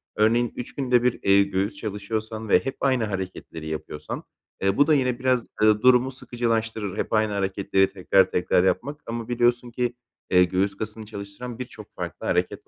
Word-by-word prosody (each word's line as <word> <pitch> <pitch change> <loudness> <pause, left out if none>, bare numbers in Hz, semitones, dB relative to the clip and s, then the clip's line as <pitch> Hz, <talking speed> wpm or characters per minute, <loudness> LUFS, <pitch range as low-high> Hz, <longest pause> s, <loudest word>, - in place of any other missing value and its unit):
örneğin, 115 +2 +2
3 125 - -7
günde 125 -3 +2
1, 125 -1 +1
eee, 100 0 +6
göğüs 100 +3 -1
çalışıyorsan 110 -2 -4
ve - - +6
hep 135 - -2
aynı 130 -4 +2
hareketleri 95 -5 -5
yapıyorsan, 75 -1 -5 0.4
ııı, 95 0 +2
bu 145 - +5
da 155 - +5
yine 125 -3 +1
biraz, 130 -2 +1 0.2
ııı, 110 0 +5
durumu 125 +1 +5
sıkıcılaştırır. 115 -5 -2
Hep - - -2
aynı 110 -1 +2
hareketleri 95 0 +1
tekrar 95 0 +3
tekrar 90 0 +2
yapmak. 140 +10 0
Ama 115 -1 -4
biliyorsun 120 0 +1
ki, 120 0 -1 0.3
eee, 90 0 +6
göğüs 95 +2 0
kasını 110 0 -6
çalıştıran 105 +4 -8
birçok 125 - -9
farklı - - -6
hareket - - -1
110 Hz, 170 wpm, -25 LUFS, 100-125 Hz, 0.4 s, eee